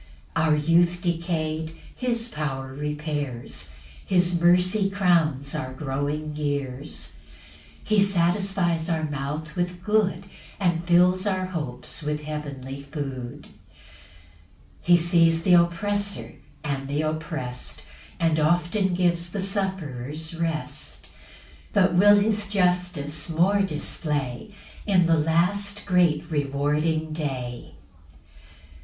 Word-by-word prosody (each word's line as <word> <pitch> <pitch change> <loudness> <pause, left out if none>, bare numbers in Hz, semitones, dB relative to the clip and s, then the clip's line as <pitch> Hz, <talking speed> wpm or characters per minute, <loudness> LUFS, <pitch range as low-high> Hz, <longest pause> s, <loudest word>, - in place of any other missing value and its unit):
5 - - +2
Our 155 -1 +4
youth 170 +3 +3
decay'd 160 -2 -2 0.2
his 235 -2 -1
power 135 - -4
repairs; 145 - -4 0.3
His 175 -2 +2
mercy 180 +3 +4
crowns 165 -8 +2
our 130 -4 -4
growing 145 +2 -3
years; 145 -1 -4 0.7
He 215 -1 +2
satisfies 175 -2 +1
our 160 -2 0
mouth 150 +1 -4
with 175 0 -2
good, 195 -3 +1 0.3
And 175 -3 +1
fills 180 +2 +4
our 185 -2 0
hopes 150 -8 -4
with 150 0 -2
heavenly 140 -3 -6
food. 140 -2 -6 0.2
6 - - -27 1.1
He 175 0 +5
sees 165 -1 +4
th' 180 - +4
oppressor 200 +4 +1 0.3
and 135 -2 -2
th' 145 +2 0
opprest, 155 -5 -4 0.4
And 160 -2 +2
often 175 +4 +2
gives 175 -1 +1
the 200 - -4
sufferers 160 - -3
rest; 155 -3 -4 0.6
But 190 -3 +4
will 205 +3 +7
his 205 0 +1
justice 180 -6 0
more 185 +5 +3
display 150 - -3 0.3
In 185 -4 +4
the 165 0 +4
last 200 +6 +1
great 170 -4 +2
rewarding 150 +2 0
day. 130 -6 -4
165 Hz, 110 wpm, -25 LUFS, 150-180 Hz, 1.1 s, will